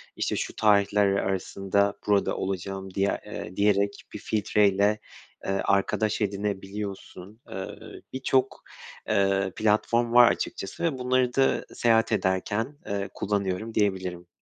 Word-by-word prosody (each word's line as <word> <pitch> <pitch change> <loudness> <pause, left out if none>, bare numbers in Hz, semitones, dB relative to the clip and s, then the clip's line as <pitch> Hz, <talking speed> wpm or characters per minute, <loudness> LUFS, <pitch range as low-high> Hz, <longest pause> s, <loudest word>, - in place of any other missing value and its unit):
işte - - -1
şu - - -3
tarihler 105 -1 +3
arasında 100 +1 0
burada 100 -1 +2
olacağım 95 0 -4
diye 100 0 0
eee, 90 - -7
diyerek 100 0 +3 0.2
bir 105 - -6
filtreyle, 105 -1 +2 0.5
eee, - - -1
arkadaş 105 +2 +1
edinebiliyorsun. 100 0 -4
Eee, 95 0 -5 0.5
birçok, 130 0 0 0.5
eee, 95 -1 +2
platform 115 +2 +1
var 120 -1 +8
açıkçası 95 - -5
ve 160 -6 0
bunları 125 -1 +1
da 135 0 +2
seyahat 115 -1 +2
ederken, 105 +8 -1
eee, 100 -1 -2
kullanıyorum, 100 +2 -2
diyebilirim. 95 -4 -1
100 Hz, 115 wpm, -26 LUFS, 95-110 Hz, 0.5 s, var